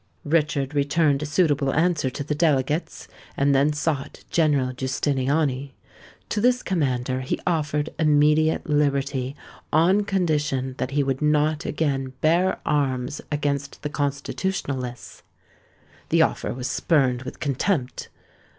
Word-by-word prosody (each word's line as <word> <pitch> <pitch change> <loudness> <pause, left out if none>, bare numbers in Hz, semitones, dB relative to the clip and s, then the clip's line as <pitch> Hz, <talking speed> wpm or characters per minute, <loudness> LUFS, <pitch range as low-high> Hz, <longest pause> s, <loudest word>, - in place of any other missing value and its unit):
Richard 145 -3 +1
returned 145 0 +2
a 150 - -3
suitable 145 -4 +2
answer 160 -4 +2
to 145 +3 -5
the 150 - -2
delegates, 150 0 0 0.3
and 140 0 +3
then 140 +2 +3
sought 150 -2 -3
General 145 -6 +2
Giustiniani. 135 +1 -1 0.5
To 210 - -1
this 250 +2 +3
commander 130 -7 -1
he 130 - -2
offered 150 -3 0
immediate 150 +1 +3
liberty, 140 -2 0 0.4
on 180 +7 +4
condition 150 -9 0
that - - -1
he 140 +1 +1
would 135 0 -2
not 150 +2 +1
again 135 -4 -1
bear 170 +4 +2
arms 135 -1 -1
against 145 -1 -2
the 150 - -2
Constitutionalists. 140 -3 -3 0.9
The - - +5
offer - - -1
was 125 0 -4
spurned 130 -6 +1
with 130 - -8
contempt. 140 0 -1
145 Hz, 125 wpm, -24 LUFS, 135-155 Hz, 0.9 s, The